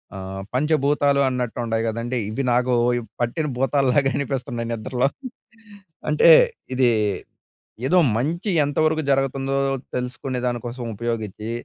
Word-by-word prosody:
ఆహ్, 95 0 -6
పంచభూతాలు 145 0 +2
అన్నట్టు 125 -2 -3
ఉంటాయి 115 0 -1
కదండీ! 115 +3 -2
ఇవి 135 +6 -2
నాకు 125 +1 +2 0.5
పట్టిన 135 +7 -1
భూతాలులాగా 135 0 +2
అనిపిస్తున్నాయి 125 -4 -3
నిద్రలో. 125 +4 0 1.0
అంటే - - +5 0.5
ఇది 130 -1 +4 1.0
ఏదో 180 +6 +4 0.2
మంచి 170 - -1
ఎంతవరకు 155 +2 +1
జరుగుతుందో 135 0 0 0.4
తెలుసుకునే 125 +1 -3
దాని 120 -1 0
కోసం 120 0 -6
ఉపయోగించి, 110 -1 -4
130 Hz, 110 wpm, -22 LUFS, 120-140 Hz, 1.0 s, అంటే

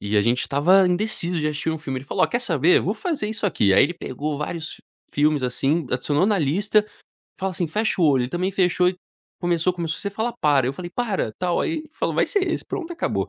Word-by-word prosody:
e 105 +1 -2
a 100 - +3
gente 120 +3 +1
tava 180 +7 +4
indeciso 180 -2 0
de 150 - -1
assistir 150 +1 -2
um 160 - -3
filme, 135 -4 -4
ele 130 - -11
falou: - - -1
"Ó - - 0
quer 240 - -1
saber? 165 - +3
Vou 200 - -1
fazer 250 -2 -2
isso 220 -1 -2
aqui." 100 - +2
Aí 95 - +6
ele 175 - -3
pegou 145 0 -4
vários 160 +2 -5 0.3
filmes 150 -1 +2
assim, 135 +5 0
adicionou 145 +7 +1
na 210 -2 +2
lista, 200 +8 +2 0.5
fala 190 0 -1
assim: 175 -1 -1
"Fecha 210 +4 -1
o - - +4
olho", 135 -5 +4
ele 125 - -4
também 180 +2 -1
fechou 180 -1 +2
e 180 - -3 0.4
começou 175 0 +1
começou: 165 -2 -3
"Você 200 - -2
fala 220 +4 -2
para." 145 -4 +3
Eu 135 - -1
falei: 175 +4 -7
"Para 200 - -2
tal." 175 +8 -1
Aí 320 -1 -2
falou: - - -2
"Vai - - +2
ser 405 -2 0
esse, - - -2
pronto 345 -2 -5
e - - -7
acabou." 335 - -2
175 Hz, 240 wpm, -23 LUFS, 145-200 Hz, 0.5 s, Aí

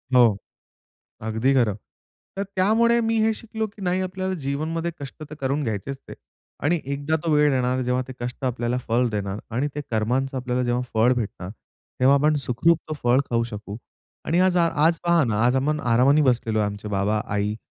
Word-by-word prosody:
हो, 115 -5 +6 0.9
अगदी 110 +5 +1
खरं. 120 -7 +2 0.6
तर 200 - 0
त्यामुळे 220 +5 +2
मी 225 0 +1
हे 220 0 +3
शिकलो 220 0 -4
की 210 0 -16
नाही 185 0 0
आपल्याला 185 0 -3
जीवनमध्ये 160 +5 -2
कष्ट 140 +2 -8
तर 155 - -8
करून 140 +2 -1
घ्यायचेच 115 +3 -3
ते - - -8 0.5
आणि 165 +4 +2
एकदा 140 +3 -1
तो 165 - -1
वेळ 150 -1 +4
येणार 130 0 +1
जेव्हा 125 0 0
ते 130 - -7
कष्ट 125 +3 -6
आपल्याला 120 -1 -1
फळ 120 +2 +2
देणार 100 -1 -3 0.2
आणि 135 +5 +1
ते 150 - -2
कर्मांचा 125 +5 0
आपल्याला 125 0 -1
जेव्हा 120 0 0
फळ 115 +3 +4
भेटणार, 105 -6 -4 0.5
तेव्हा 130 +2 +5
आपण 150 +2 +3
सुखरुप 155 +8 +3
तो - - -1
फळ 120 +2 +4
खाऊ 115 -1 +1
शकू 105 -2 -7 0.5
आणि 170 - +1
आज 185 -1 +3
आ 170 -1 +4 0.2
आज 165 0 +3
पहा 170 -2 +4
ना 110 -4 0
आज 125 +2 +3
आपण 150 +3 +1
आरामाने 130 +4 +4
बसलेलो 120 -5 +1
आहे, 105 - +2
आमचे 105 +1 -5
बाबा-आई 105 +1 -1
130 Hz, 185 wpm, -24 LUFS, 115-165 Hz, 0.9 s, हो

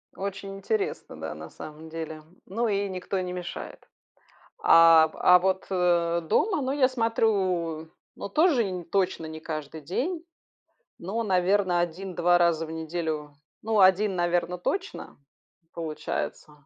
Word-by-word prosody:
Очень 195 0 -5
интересно, 205 +2 -3
да, 80 -1 -5
на 80 +1 -9
самом 155 +1 -10
деле, 160 -1 -6 0.2
ну 230 +5 -1
и 200 -1 0
никто 185 +1 -3
не 180 0 -4
мешает. 180 -1 -7 0.8
А, 165 -1 +7
а 180 0 +6
вот, 190 +1 0
э, 170 -2 +2
дома, 355 - +1
ну, 265 0 -1
я 270 -3 +3
смотрю 190 -9 0 0.3
ну - - -6
тоже 300 - +3
инь 180 -2 -5
точно 185 -3 -1
не 160 0 -8
каждый 155 -1 -6
день, 305 - -3 0.8
но, 205 +7 -3
наверно, 185 -2 +2
1, 180 +2 -4
2 175 0 +4
раза 170 -2 +2
в 160 - -9
неделю. 160 -2 -4 0.3
Ну, 220 -1 0
1, 190 +1 +4
наверно, 175 0 0
точно 385 - -4 0.6
получается. 155 -2 -5
180 Hz, 135 wpm, -26 LUFS, 160-200 Hz, 0.8 s, А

